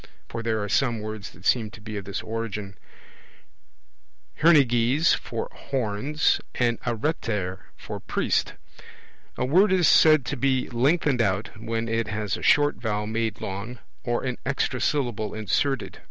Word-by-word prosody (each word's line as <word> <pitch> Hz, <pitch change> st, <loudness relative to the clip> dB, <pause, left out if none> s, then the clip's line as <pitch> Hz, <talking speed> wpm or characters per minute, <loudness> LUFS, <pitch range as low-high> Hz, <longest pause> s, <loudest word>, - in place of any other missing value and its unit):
(for 115 Hz, -, -5 dB
there 110 Hz, -2 st, -1 dB
are -, -, -3 dB
some 120 Hz, +1 st, +1 dB
words 110 Hz, -2 st, -6 dB
that -, -, -17 dB
seem 115 Hz, -4 st, +2 dB
to 110 Hz, +1 st, -13 dB
be 110 Hz, 0 st, -7 dB
of 100 Hz, -2 st, -5 dB
this 100 Hz, -, -4 dB
origin) 105 Hz, -3 st, -4 dB, 1.7 s
hernyges 140 Hz, -1 st, +4 dB
for 115 Hz, -2 st, -3 dB
horns, 135 Hz, +4 st, 0 dB
and 120 Hz, -2 st, +1 dB
areter 110 Hz, -, -2 dB, 0.2 s
for -, -, -7 dB
priest. -, -, -1 dB, 0.8 s
A -, -, 0 dB
word 185 Hz, +9 st, +4 dB
is 180 Hz, -3 st, +4 dB
said 155 Hz, -4 st, +6 dB
to 145 Hz, -, -2 dB
be 130 Hz, 0 st, +1 dB
lengthened 135 Hz, +1 st, +2 dB
out, 100 Hz, 0 st, 0 dB
when 115 Hz, +1 st, -3 dB
it 115 Hz, 0 st, -1 dB
has 105 Hz, -1 st, -2 dB
a -, -, -7 dB
short 145 Hz, 0 st, +4 dB
vowel 105 Hz, -2 st, -2 dB
made 110 Hz, +1 st, -2 dB
long, 100 Hz, +6 st, -5 dB, 0.3 s
or 120 Hz, 0 st, -1 dB
an 125 Hz, -2 st, -3 dB
extra 130 Hz, -1 st, -1 dB
syllable 120 Hz, -8 st, -1 dB
inserted; 130 Hz, +5 st, -1 dB
e. -, -, -17 dB
115 Hz, 155 wpm, -25 LUFS, 105-135 Hz, 1.7 s, said